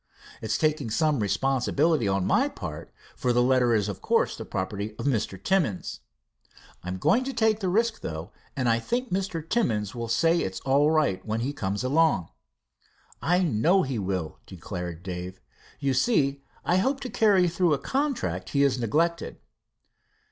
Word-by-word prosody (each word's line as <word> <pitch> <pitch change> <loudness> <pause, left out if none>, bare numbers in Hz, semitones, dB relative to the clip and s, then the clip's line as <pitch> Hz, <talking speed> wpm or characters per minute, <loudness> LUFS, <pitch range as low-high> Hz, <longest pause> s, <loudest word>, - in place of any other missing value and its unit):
It's 110 -1 -1
taking 155 -5 0
some 150 +4 +1
responsibility 135 - +1
on 95 -1 +1
my - - +2
part, - - -7 0.2
for 125 - 0
the 120 0 +3
letter 125 -2 +3
is 105 -2 +1
of 100 - -5
course - - +1
the - - -7
property 100 +2 -4
of - - -5
Mr. 110 -8 0
Timmins. 150 - -1 0.8
I'm 90 +1 -5
going 235 - +3
to 270 - -3
take 220 -2 +2
the 190 -4 -1
risk, 225 +4 +1
though, 80 +4 -6 0.2
and 130 -2 -1
I 115 0 +3
think 245 - -2
Mr. 185 -4 -2
Timmins 110 - 0
will 120 -2 -4
say 165 +9 +2
it's 95 - -3
all 140 +3 +3
right 155 -12 +1
when 110 +1 -2
he 135 +4 -2
comes 100 -4 -3
along." 145 - +2 0.9
"I 180 +2 +2
know 165 - +3
he 130 -4 -3
will," 95 -5 -3
declared 90 -1 -6
Dave. 90 0 -6 0.4
"You 140 -2 0
see, 140 - +2 0.2
I 180 - +3
hope 265 +8 +1
to 255 - -4
carry 200 -5 +4
through 170 -2 +2
a - - -3
contract 140 - -2
he 140 - +5
has 130 -2 +2
neglected." 165 +9 0
135 Hz, 170 wpm, -26 LUFS, 105-170 Hz, 0.9 s, he